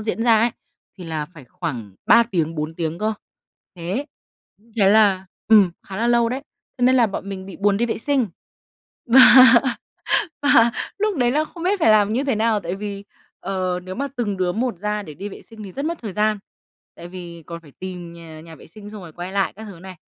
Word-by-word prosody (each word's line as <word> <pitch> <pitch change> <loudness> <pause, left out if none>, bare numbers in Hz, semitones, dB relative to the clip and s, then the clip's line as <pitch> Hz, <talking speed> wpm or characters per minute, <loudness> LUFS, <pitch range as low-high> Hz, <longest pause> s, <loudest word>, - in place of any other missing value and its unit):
diễn 220 +1 -2
ra 230 -2 +5
ấy, 230 +2 +2 0.5
thì 180 - -8
là 155 -2 -4
phải 155 -4 -15
khoảng 120 - -6
3 235 - +7
tiếng, 165 -8 -2
4 155 +1 -4
tiếng 165 0 -3
cơ, 215 +1 0 0.6
thế. 185 - -3 0.7
Thế 195 -2 +5
là, 200 -3 +4 0.2
ừm, 210 -5 +6 0.2
khá 190 - -7
là 230 +4 0
lâu 235 -1 +3
đấy, 260 +4 -4 0.4
cho - - -4
nên 260 +1 +5
là 240 -3 +5
bọn 195 -1 -6
mình 190 -1 -6
bị 195 - -9
buồn 200 0 +2
đi 235 +3 0
vệ 225 - -3
sinh. 275 -1 +1 0.8
Và 255 +3 +8 1.2
và 235 -5 +5 0.3
lúc 425 -5 0
đấy 245 -1 +2
là 305 +3 +1
không 335 +2 -10
biết 385 +2 +1
phải 225 - +5
làm 210 0 +4
như 260 +4 0
thế 270 -4 0
nào, 220 0 +1
tại 175 -1 -4
vì, 200 0 -6 0.3
ờ, 185 -2 -2
nếu 185 +1 -7
mà 280 +2 -2
từng 205 -5 -2
đứa 180 -1 0
một 230 +1 -2
ra 210 0 -2
để 155 - -10
đi 200 +8 -7
vệ - - -11
sinh 225 -2 -12
thì 195 - -9
rất 275 +9 -4
mất 335 +1 -2
thời 215 -5 -6
gian. 210 +1 +1 0.6
Tại 170 - -10
vì 175 -2 -10
còn 170 -1 -7
phải 150 - -17
tìm 180 -2 -7
nhà 165 -2 -11
nhà 165 0 -12
vệ - - -16
sinh, 205 +4 -12
xong 210 -1 -9
rồi 165 -3 -11
quay 175 +3 -7
lại 195 -1 0
các 220 +2 -10
thứ 195 -5 -11
này. 190 0 -10
200 Hz, 225 wpm, -21 LUFS, 175-230 Hz, 1.2 s, Và